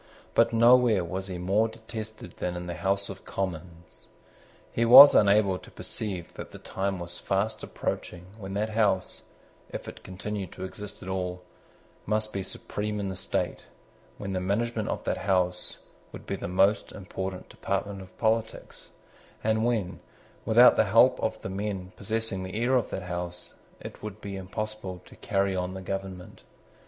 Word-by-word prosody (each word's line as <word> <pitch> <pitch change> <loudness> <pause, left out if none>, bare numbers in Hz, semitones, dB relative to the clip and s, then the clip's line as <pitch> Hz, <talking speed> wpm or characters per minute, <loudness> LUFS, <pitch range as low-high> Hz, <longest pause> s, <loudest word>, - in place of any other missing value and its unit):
But 115 0 +4
nowhere 115 -3 +5
was 95 +3 -4
he 90 -2 -4
more 100 +5 +2
detested 110 -4 -8
than 90 0 -2
in 90 0 -5
the 85 - -4
House 100 +2 0
of 95 -1 -9
Commons. 85 -2 -6 0.6
He 115 - +1
was 130 +5 +11
unable 100 -2 +4
to - - -14
perceive 95 -6 -5
that - - -8
the - - -10
time 95 0 -2
was 85 0 -7
fast 100 +3 -1
approaching 90 0 -4
when 95 -1 -6
that 105 +2 -1
House, 100 -4 +1 0.5
if - - -7
it - - -9
continued 95 0 -5
to 95 - -7
exist 105 +2 -7
at 95 - -6
all, 90 -1 -3 0.6
must 110 0 0
be 100 - -2
supreme 105 +2 -4
in 100 -1 -2
the 95 - -4
state, 90 - -2 0.5
when 100 -1 -4
the 95 - 0
management 110 +4 -1
of - - -3
that - - -1
House 90 -2 +1 0.3
would - - -10
be - - -2
the - - -5
most 100 +3 +2
important 95 -1 -5
department 100 -1 -3
of 95 -1 -14
politics, 110 0 -1 0.5
and 110 0 +2
when, 110 -6 0 0.5
without - - +7
the - - +5
help - - +5
of - - -2
men 95 -1 -4
possessing 110 -1 -2
the 95 +3 -5
ear 120 +3 +2
of 120 -4 +1
that 95 - -4
House, 90 0 -4 0.3
it - - -9
would 105 -1 -7
be 100 -2 -6
impossible 95 -1 -5
to - - -15
carry 100 -1 0
on 90 0 -2
the 95 - -6
government. 95 -2 -6
95 Hz, 165 wpm, -28 LUFS, 95-110 Hz, 0.6 s, was